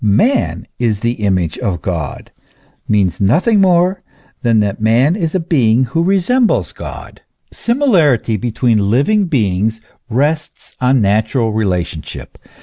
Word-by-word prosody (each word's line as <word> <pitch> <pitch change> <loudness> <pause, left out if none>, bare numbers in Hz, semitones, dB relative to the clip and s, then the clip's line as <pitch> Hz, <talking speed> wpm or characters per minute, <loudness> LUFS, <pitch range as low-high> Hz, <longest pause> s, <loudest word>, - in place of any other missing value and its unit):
" - - -11
Man 110 - +1
is 110 -4 0
the 115 - +1
image 95 -5 -1
of 90 -5 -3
God," 85 -7 -5 0.6
means 100 -4 0
nothing 185 - +3
more 180 0 +2 0.4
than 115 -2 +2
that 100 0 -2
man 120 +9 +3
is 170 -4 -2
a - - +2
being 130 -8 +2
who 135 +7 -1
resembles 200 +7 +1
God. - - -9 0.3
Similarity 180 - +1
between 110 -1 0
living 190 - +2
beings 110 - 0 0.3
rests 150 +6 -2
on 130 0 +3
natural 110 +3 +1
relationship. 90 -7 -4
120 Hz, 130 wpm, -15 LUFS, 105-170 Hz, 0.6 s, nothing